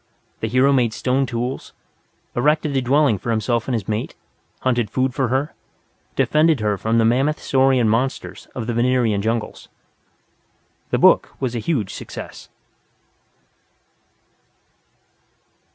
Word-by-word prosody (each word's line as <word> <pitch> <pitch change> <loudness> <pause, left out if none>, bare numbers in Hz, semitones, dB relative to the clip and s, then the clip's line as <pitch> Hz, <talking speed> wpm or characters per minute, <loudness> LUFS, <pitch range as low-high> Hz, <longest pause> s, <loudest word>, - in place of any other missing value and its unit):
The 110 - -2
hero 130 +4 +3
made 120 -4 +2
stone 130 +3 0
tools, 125 +2 -4 0.6
erected 150 +3 +1
a 135 - +2
dwelling 130 -4 +2
for 115 - -6
himself 115 +1 0
and 130 - 0
his 105 -4 -3
mate, 110 0 -3 0.5
hunted 120 -4 0
food 130 +2 0
for 135 -1 0
her, 135 +5 -1 0.6
defended 155 -1 +3
her 105 -1 0
from 110 +4 0
the 115 - +4
mammoth 135 +6 +2
saurian 130 -3 +2
monsters 120 +5 -2
of 120 - -4
the 120 - -2
Venerian 120 -3 +1
jungles. 115 +1 -3 1.2
The - - +1
book - - +4
was 130 -3 -2
a 120 - -2
huge 110 - -2
success. - - -9
125 Hz, 130 wpm, -21 LUFS, 115-135 Hz, 1.2 s, the